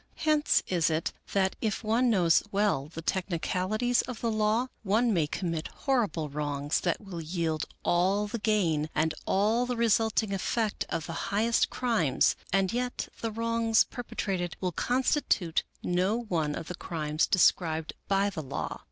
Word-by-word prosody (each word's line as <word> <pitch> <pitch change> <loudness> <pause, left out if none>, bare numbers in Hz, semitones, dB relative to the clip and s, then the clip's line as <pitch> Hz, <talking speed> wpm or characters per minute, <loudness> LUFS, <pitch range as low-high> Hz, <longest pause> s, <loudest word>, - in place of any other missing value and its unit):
Hence 305 -1 +2
is 170 -3 +2
it, 160 +1 -1 0.2
that 190 -1 +2
if 220 0 -1
one 230 +3 +2
knows 175 -7 +4
well 200 -9 +1
the 165 +1 -8
technicalities 190 +7 0
of 250 -3 -7
the 230 - 0
law, 220 +3 +1
one 225 +3 +2
may 165 -5 +2
commit 165 -1 -3
horrible 225 - -1
wrongs 145 0 -1
that 175 - 0
will 190 -5 -7
yield 160 -1 -2 0.2
all 190 +4 +2
the 225 +3 -4
gain 175 -9 +1
and 155 +1 +1
all 220 +5 +2
the 245 - -1
resulting 225 -2 +2
effect 215 +3 -1
of 160 - -2
the 165 - -5 0.2
highest 220 +4 +2
crimes, 220 - +2 0.2
and 195 0 +2
yet 250 +1 -2
the 230 - -2
wrongs 230 0 +2
perpetrated 190 -8 -4
will 185 -1 -1
constitute 245 - +1 0.2
no 180 +4 +1
one 165 -11 -1
of 160 - -6
the - - -5
crimes 155 -3 -1
described 160 -4 +2
by 200 +1 +2
the 175 -5 -4
law. 135 - -4
195 Hz, 155 wpm, -29 LUFS, 165-225 Hz, 0.2 s, knows